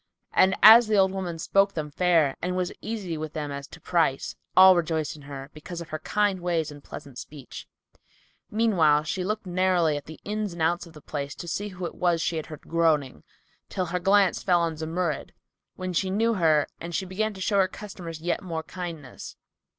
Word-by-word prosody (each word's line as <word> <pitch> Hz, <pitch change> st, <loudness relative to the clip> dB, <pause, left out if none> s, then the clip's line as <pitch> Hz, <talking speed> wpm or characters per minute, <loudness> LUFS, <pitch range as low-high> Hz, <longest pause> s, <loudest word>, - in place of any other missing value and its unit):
And 190 Hz, 0 st, +4 dB
as 225 Hz, +2 st, +10 dB
the 215 Hz, -1 st, +2 dB
old 190 Hz, -1 st, +4 dB
woman 185 Hz, -3 st, -4 dB
spoke 195 Hz, +4 st, +2 dB
them 150 Hz, -2 st, -4 dB
fair 165 Hz, -4 st, +3 dB
and 180 Hz, +1 st, -2 dB
was 180 Hz, -1 st, -1 dB
easy 195 Hz, -8 st, -4 dB
with 155 Hz, 0 st, -5 dB
them 150 Hz, -2 st, -4 dB
as 140 Hz, 0 st, -6 dB
to -, -, -13 dB
price, 165 Hz, -6 st, 0 dB, 0.2 s
all 190 Hz, 0 st, +9 dB
rejoiced 160 Hz, -3 st, -1 dB
in 150 Hz, -, -13 dB
her, 140 Hz, 0 st, -9 dB
because 165 Hz, +3 st, -8 dB
of 170 Hz, -, -8 dB
her 155 Hz, -, -4 dB
kind 205 Hz, 0 st, 0 dB
ways 165 Hz, -3 st, -1 dB
and 145 Hz, -1 st, -12 dB
pleasant 135 Hz, -4 st, -9 dB
speech. 145 Hz, -5 st, -10 dB, 0.8 s
Meanwhile, 175 Hz, -10 st, +3 dB
she 180 Hz, +4 st, -3 dB
looked 215 Hz, +3 st, -3 dB
narrowly 180 Hz, -3 st, +2 dB
at 145 Hz, -, -8 dB
the 160 Hz, -, -10 dB
ins 210 Hz, -2 st, -2 dB
and 170 Hz, -, -7 dB
outs 175 Hz, +2 st, 0 dB
of 165 Hz, -, -15 dB
the 150 Hz, -3 st, -14 dB
place 140 Hz, -2 st, -5 dB
to 175 Hz, -, -8 dB
see 205 Hz, +5 st, -2 dB
who 185 Hz, -2 st, -6 dB
it -, -, -5 dB
was 175 Hz, -2 st, +1 dB
she 170 Hz, 0 st, -1 dB
had 155 Hz, -, -4 dB
heard 155 Hz, -2 st, -9 dB
groaning, 160 Hz, -5 st, 0 dB, 0.5 s
till 185 Hz, -, -2 dB
her 180 Hz, +1 st, -2 dB
glance 195 Hz, +1 st, +3 dB
fell 175 Hz, -2 st, +3 dB
on 165 Hz, -1 st, -1 dB
Zumurrud, 160 Hz, +1 st, -3 dB, 0.4 s
when 185 Hz, 0 st, -4 dB
she 190 Hz, +2 st, 0 dB
knew 225 Hz, +4 st, +2 dB
her 160 Hz, -6 st, +3 dB
and 170 Hz, 0 st, -6 dB
she 190 Hz, -, -1 dB
began 210 Hz, +3 st, -2 dB
to 190 Hz, -, -9 dB
show 200 Hz, +1 st, +2 dB
her 190 Hz, -, +4 dB
customers 180 Hz, -5 st, -8 dB
yet 175 Hz, +1 st, -1 dB
more 165 Hz, -4 st, -4 dB
kindness. 165 Hz, -8 st, -8 dB
175 Hz, 210 wpm, -26 LUFS, 155-190 Hz, 0.8 s, as